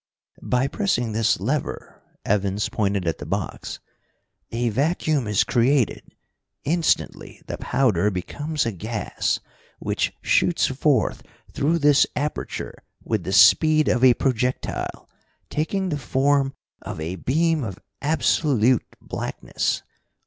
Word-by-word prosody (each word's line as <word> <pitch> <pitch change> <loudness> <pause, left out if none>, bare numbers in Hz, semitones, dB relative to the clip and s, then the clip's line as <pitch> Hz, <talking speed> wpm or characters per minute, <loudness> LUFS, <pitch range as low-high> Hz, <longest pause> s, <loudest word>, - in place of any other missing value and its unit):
"By 125 +2 +1
pressing 140 - 0
this 110 0 +1
lever" 135 +9 -3 0.2
Evans 100 0 0
pointed 100 -3 0
at 80 - -1
the - - -6
box 95 +2 -4 0.7
"a 120 +1 -1
vacuum 145 - 0
is 105 -2 +3
created. 125 -1 +2 0.6
Instantly 165 +3 0
the - - -6
powder 110 -8 +2
becomes 145 - -3
a 115 - 0
gas, 105 +3 -2 0.4
which - - -1
shoots - - +3
forth - - +1 0.3
through 160 +4 +1
this 145 -2 +5
aperture 150 +1 -4 0.2
with 110 -6 -2
the 95 - -2
speed 115 +10 +6
of 120 - +1
a 125 -2 +7
projectile, 125 -1 -2 0.4
taking 185 +5 -1
the 150 -3 -2
form 135 +1 +1 0.3
of - - -7
a 85 +4 -4
beam 160 - +1
of 95 -5 -5 0.2
absolute 135 -5 +2
blackness. - - -3
125 Hz, 120 wpm, -23 LUFS, 105-150 Hz, 0.7 s, a